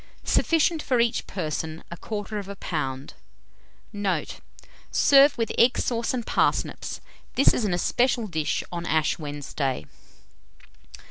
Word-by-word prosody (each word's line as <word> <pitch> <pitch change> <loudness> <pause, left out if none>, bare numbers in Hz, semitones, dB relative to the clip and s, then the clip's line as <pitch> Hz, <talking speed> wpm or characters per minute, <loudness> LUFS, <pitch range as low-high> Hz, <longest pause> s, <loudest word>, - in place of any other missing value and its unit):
Sufficient 325 0 +2
for 255 -4 +1
each 235 -1 +1
person, 160 -2 -4
1/4 205 +3 -5
lb. 135 -6 -3 0.8
Note. 195 -6 -2 0.5
Serve 280 0 +5
with 230 -1 -1
egg 240 +2 +5
sauce 235 -1 0
and 245 -3 -3
parsnips. - - 0 0.3
This 275 - +5
is 235 - 0
an 195 - 0
especial 240 +6 +1
dish 160 -6 -1
on 170 -1 -4
Ash 155 0 +1
Wednesday. 145 - -3
200 Hz, 115 wpm, -25 LUFS, 155-240 Hz, 0.8 s, Serve